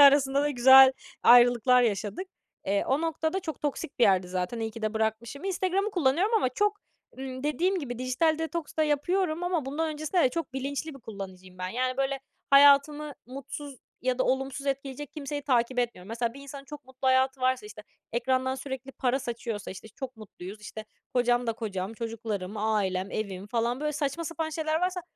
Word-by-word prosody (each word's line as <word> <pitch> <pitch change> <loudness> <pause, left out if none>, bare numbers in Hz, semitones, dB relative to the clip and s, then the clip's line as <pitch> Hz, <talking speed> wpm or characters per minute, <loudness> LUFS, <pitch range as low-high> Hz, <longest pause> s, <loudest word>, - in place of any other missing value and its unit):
arasında 280 -1 +6
da 295 - +1
güzel 265 0 +8 0.3
ayrılıklar 245 +1 +6
yaşadık. 215 - -1 0.4
Eee, 200 +1 +1
o 270 +3 +1
noktada 325 +2 -1
çok 315 -6 -6
toksik 290 -1 -4
bir 240 - +6
yerdi 185 -2 +3
zaten, 185 +5 -3
iyi 225 0 -2
ki 225 +1 -10
de 215 0 -1
bırakmışım. 220 - -2
Instagram'ı 385 +2 0
kullanıyorum 355 - +2
ama 425 -12 +3
çok, 410 +10 0 0.4
ımm, 260 -1 -6
dediğim 350 +6 +1
gibi 245 -7 -5
dijital 255 +6 +1
detoks 325 -1 -4
da - - +5
yapıyorum 315 +3 0
ama 350 -5 0
bundan 310 +4 -1
öncesinde 310 +4 0
de - - +5
çok 300 +1 -4
bilinçli 280 +3 -4
bir 275 - -12
kullanıcıyım 190 -4 -9
ben, 185 - -3
yani, 255 +5 -1
böyle, 270 0 -1 0.3
hayatımı 285 +2 +6
mutsuz 275 +1 -8 0.3
ya 255 0 0
da - - +2
olumsuz 270 +1 -1
etkileyecek 275 0 -3
kimseyi 290 -1 -5
takip 250 -2 +1
etmiyorum. 230 -6 -2
Mesela, 230 +1 -2
bir 275 - -10
insanın 280 0 -9
çok 290 +1 -10
mutlu 260 +1 -3
hayatı 260 +1 +3
varsa, 255 -3 +1
işte, 210 0 -11 0.3
ekrandan 260 +2 +1
sürekli 265 0 -6
para 260 0 0
saçıyorsa, 235 -4 -5
işte, 190 +3 -9
"Çok 255 +3 -8
mutluyuz, 210 -1 -10
işte, 215 +1 -8 0.3
kocam 245 0 +2
da 230 - +1
kocam, 205 -3 -4
çocuklarım, 220 -4 -4
ailem, 200 -3 0
evim" 200 -3 -4
falan, 235 +3 -1
böyle, 300 0 -1
saçma 295 +2 -2
sapan 325 -1 -3
şeyler 315 0 -1
varsa, 365 0 -1
260 Hz, 180 wpm, -28 LUFS, 230-295 Hz, 0.4 s, güzel